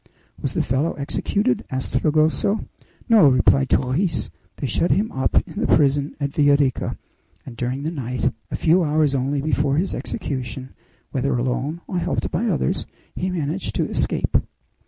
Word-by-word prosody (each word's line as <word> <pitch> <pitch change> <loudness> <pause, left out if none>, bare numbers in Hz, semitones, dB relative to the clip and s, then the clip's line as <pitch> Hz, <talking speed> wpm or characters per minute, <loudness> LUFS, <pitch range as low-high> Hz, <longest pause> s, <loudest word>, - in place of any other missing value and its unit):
"Was - - -2
the - - +1
fellow 135 +7 0
executed?" 140 +2 -1
asked 130 0 -4
Fragoso. 155 +7 +1 0.4
"No," 220 - +7
replied 135 +1 +4
Torres; 145 +8 0 0.2
"they - - -4
shut 135 +7 +1
him 210 +3 +2
up 130 - -1
in - - -7
the - - +1
prison 140 -1 +2
at 140 -1 -1
Villa 145 -1 +4
Rica, 135 -3 0 0.5
and 125 - -9
during 125 +4 -3
the 160 - -2
night, 125 -5 -2 0.2
a - - -3
few 170 +2 +3
hours 150 -2 +2
only 135 +1 0
before 145 -2 +1
his 185 +4 0
execution, 130 - -4 0.4
whether 135 -1 0
alone 130 +6 -2
or 180 - -2
helped - - -2
by - - 0
others, 65 0 0 0.3
he 185 - -2
managed 170 +1 -2
to - - +1
escape." - - +1
140 Hz, 160 wpm, -22 LUFS, 130-160 Hz, 0.5 s, No